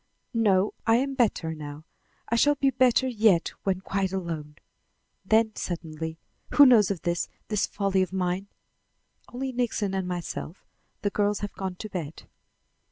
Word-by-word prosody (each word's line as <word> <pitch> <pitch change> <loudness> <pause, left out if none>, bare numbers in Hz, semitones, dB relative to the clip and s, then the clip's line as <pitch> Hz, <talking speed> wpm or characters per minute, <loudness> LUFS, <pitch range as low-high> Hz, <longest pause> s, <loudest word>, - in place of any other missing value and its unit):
"No. 205 -4 +3
I 225 - +6
am 270 +3 +1
better 215 -10 +1
now. 150 0 -8 0.4
I 235 - 0
shall 290 +5 +4
be 275 -1 +2
better 260 0 +3
yet 215 -8 +3
when 190 -1 -1
quite 190 0 -1
alone." 165 -6 -4 0.7
Then 220 +2 +3
suddenly: 160 -2 -5 0.4
"Who 290 - +9
knows 230 -6 +6
of 190 -5 -3
this 170 0 -1 0.2
this 210 -2 +1
folly 195 -2 0
of 185 - -1
mine?" 185 +1 -1 0.8
"Only 260 +2 -3
Nixon 235 -5 -1
and 190 -1 -1
myself. 175 -1 -5 0.4
The 205 - +1
girls 205 0 0
have 205 - -4
gone 190 -1 -4
to 215 - -7
bed." 165 -6 -6
195 Hz, 155 wpm, -27 LUFS, 175-225 Hz, 0.8 s, Who